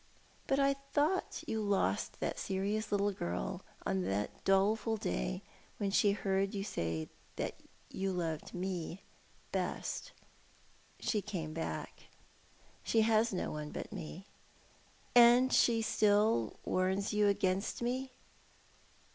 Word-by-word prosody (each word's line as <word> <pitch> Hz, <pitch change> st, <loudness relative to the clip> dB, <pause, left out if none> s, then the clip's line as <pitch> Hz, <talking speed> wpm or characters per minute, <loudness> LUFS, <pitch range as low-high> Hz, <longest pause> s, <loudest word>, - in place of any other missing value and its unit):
But 270 Hz, -, +2 dB
I 275 Hz, 0 st, +4 dB, 0.2 s
thought 310 Hz, +6 st, +1 dB
you 220 Hz, -, -1 dB
lost 200 Hz, -2 st, 0 dB
that -, -, -1 dB
serious 200 Hz, +2 st, -1 dB
little 205 Hz, 0 st, +2 dB
girl 90 Hz, -, -3 dB, 0.2 s
on 95 Hz, -, +1 dB
the 95 Hz, +3 st, 0 dB, 0.2 s
doleful 210 Hz, +3 st, +3 dB
day 60 Hz, -, -2 dB, 0.3 s
when 200 Hz, -1 st, -1 dB
she 200 Hz, 0 st, +4 dB
heard 195 Hz, 0 st, 0 dB
you 195 Hz, -, -1 dB
say 80 Hz, -, -2 dB, 0.3 s
that -, -, -4 dB, 0.3 s
you 195 Hz, 0 st, -1 dB
loved 165 Hz, -4 st, -3 dB
me 180 Hz, 0 st, -3 dB, 0.5 s
best." -, -, -2 dB, 0.9 s
"She 210 Hz, -, 0 dB
came 175 Hz, -7 st, -4 dB
back. 165 Hz, +1 st, -5 dB, 0.7 s
She 225 Hz, -, +2 dB
has 220 Hz, +1 st, +3 dB
no 185 Hz, -, -2 dB
one 150 Hz, 0 st, -4 dB
but -, -, -6 dB
me." 185 Hz, 0 st, -7 dB, 0.9 s
"And 245 Hz, +2 st, +7 dB
she 230 Hz, -2 st, +4 dB
still 205 Hz, -, +3 dB
warns 190 Hz, +2 st, +1 dB
you 210 Hz, 0 st, +4 dB
against 200 Hz, +2 st, 0 dB
me?" 260 Hz, +2 st, -1 dB
200 Hz, 120 wpm, -34 LUFS, 180-220 Hz, 0.9 s, And